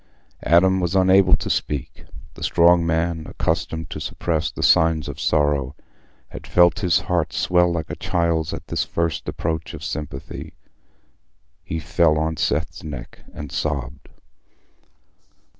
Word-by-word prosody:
Adam 95 +3 +5
was 90 +1 -1
unable 95 0 +5
to - - -6
speak. 70 -4 -3 0.3
The - - -14
strong 85 0 +4
man, 80 -1 -1
accustomed 80 -1 -2
to - - -5
suppress 80 -2 -2
the - - -5
signs 80 -2 +3
of 70 -1 -7
sorrow, 75 -2 +1 0.5
had - - -10
felt 90 +2 +4
his 90 -5 +2
heart 85 -3 -1
swell 90 -1 +2
like 85 -2 -3
a - - -4
child's 85 -3 0
at - - -6
this - - -1
first 85 -2 -2
approach 80 0 -3
of - - -10
sympathy. 70 -1 -6 1.1
He 80 - -4
fell 85 -2 +2
on 80 +1 -1
Seth's 80 +2 -1
neck 70 -6 -8
and 75 -1 -8
sobbed. 70 -5 -3
80 Hz, 140 wpm, -22 LUFS, 75-85 Hz, 1.1 s, Adam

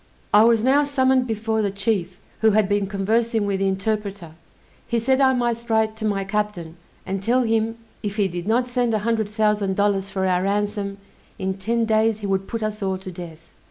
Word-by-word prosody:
I 210 +1 +8
was 230 -2 +4
now 270 +3 +4
summoned 260 -3 +2
before 220 0 -1
the 205 - +1
chief, 195 -2 -1 0.2
who 220 - +4
had 215 -2 +3
been 205 -1 0
conversing 220 +3 0
with 200 -1 -1
the 195 - +1
interpreter; 195 -2 -2 0.6
he 235 0 0
said 260 +4 +2
I 265 -1 +5
must 240 -1 -1
write 220 -1 +2
to 220 - -4
my 200 -2 0
captain, 195 -5 -3 0.3
and 195 0 -3
tell 245 +5 +2
him, 225 0 0 0.2
if 205 -2 -4
he 205 -3 +2
did 175 0 -6
not 245 +3 +2
send 245 -2 0
a 210 0 -2
hundred 225 -3 0
thousand 210 -2 +1
dollars 200 -1 +1
for 190 -1 -2
our 180 -1 +2
ransom, 200 0 -1 0.4
in 190 0 -2
ten 225 +4 -1
days 220 0 +2
he - - -4
would 195 -1 -1
put 230 -1 -4
us 215 0 -3
all 190 -1 -1
to 185 0 -8
death. 170 -2 -10
210 Hz, 205 wpm, -22 LUFS, 195-225 Hz, 0.6 s, I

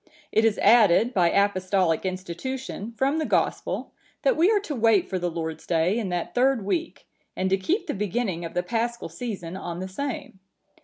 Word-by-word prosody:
It 220 - +3
is 220 -2 +2
added, 225 +1 +5
by 175 -5 +4
Apostolic 185 -3 +1
institution, 195 +6 -5
from 275 +4 +1
the 310 - 0
Gospel, - - -1 0.3
that - - +3
we 345 +4 +4
are 430 -2 +4
to 355 -7 -5
wait 225 -5 +3
for 185 - -2
the 175 0 -1
Lord's 160 -1 -5
day 175 +6 +2
in 210 -5 -3
that 175 -1 -3
third 250 -4 +2
week, 330 - -3 0.3
and 190 0 -1
to 195 - +4
keep 330 - -1
the - - -2
beginning 200 -3 -2
of 165 - -7
the 180 - +1
Paschal 235 +4 -2
season 195 -8 -6
on 175 -2 -5
the 185 - -4
same. 220 -1 -5
200 Hz, 190 wpm, -25 LUFS, 180-245 Hz, 0.3 s, added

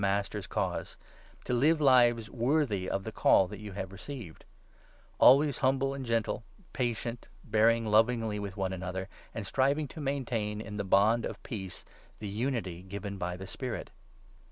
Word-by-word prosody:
Master's 100 0 -1
cause - - -3 0.2
— - - -26
to - - -1
live 150 +6 +4
lives 120 -5 +5
worthy 120 -5 0
of 95 - -1
the 110 - -5
Call 95 -2 +4
that 105 +1 -8
you 105 -2 -8
have 95 -1 -5
received; 100 - -9 0.7
always 140 +2 +6
humble 135 0 +2
and 140 -1 -5
gentle, 115 -1 -1 0.3
patient, 120 -1 -2 0.2
2 - - -19
bearing 115 +1 +4
lovingly 110 0 +2
with 100 -1 -6
one 95 -1 -1
another, 95 0 -4 0.3
and 110 -2 -4
striving 140 +7 +1
to 160 - -8
maintain 120 -7 -2
3 110 - -6
in 105 -1 -6
the 100 - -1
bond 105 +4 +4
of - - -5
peace 95 -5 -6 0.3
the 105 - -6
unity 105 -5 -2
given 100 +1 -6
by 90 0 -3
the 95 - -7
Spirit. 125 +4 -5
110 Hz, 170 wpm, -30 LUFS, 100-125 Hz, 0.7 s, always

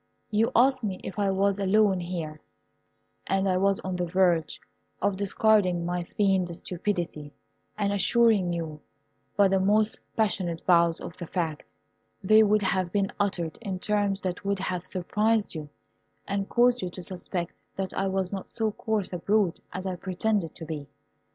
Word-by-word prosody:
You 220 +2 +2
asked 260 +1 +4
me 195 -3 -2
if 190 - -6
I 200 -1 +2
was 195 +1 +1
alone 200 -1 +3
here, 170 -3 -5 0.9
and 195 0 +1
I 185 -1 +2
was 195 +1 +2
on 185 -1 -3
the 175 -1 -1
verge 175 -3 +2 0.4
of 200 0 +1
discarding 200 -3 +2
my 175 0 -1
feigned 190 -2 +1
stupidity, 170 -5 -3 0.5
and 200 -1 0
assuring 200 -1 +3
you 160 -3 -4 0.6
by 200 -1 +6
the 190 0 +2
most 210 +3 +2 0.2
passionate 185 -6 0
vows 170 -2 +4
of - - -8
the 175 - -6
fact. 160 -4 -2 0.6
They 215 +3 +6
would 210 -1 +3
have 185 -2 0
been 195 0 0
uttered 175 -5 -1
in 195 -5 -3
terms 205 0 0
that 185 0 -3
would 200 0 0
have 185 -1 -3
surprised 210 +4 0
you, 155 -3 -6 0.6
and 200 0 -2
caused 245 0 +3
you 180 - -2
to 180 +1 -9
suspect 175 -1 -4 0.2
that 190 -1 -3
I 195 - 0
was 190 0 -1
not 195 - -5
so 220 -2 -1
coarse 210 -3 -2
a 180 - -3
brute 200 -1 +1
as 185 +1 -5
I 185 -1 -3
pretended 190 -1 -1
to 165 - -7
be. 150 -3 -6
190 Hz, 170 wpm, -27 LUFS, 175-205 Hz, 0.9 s, by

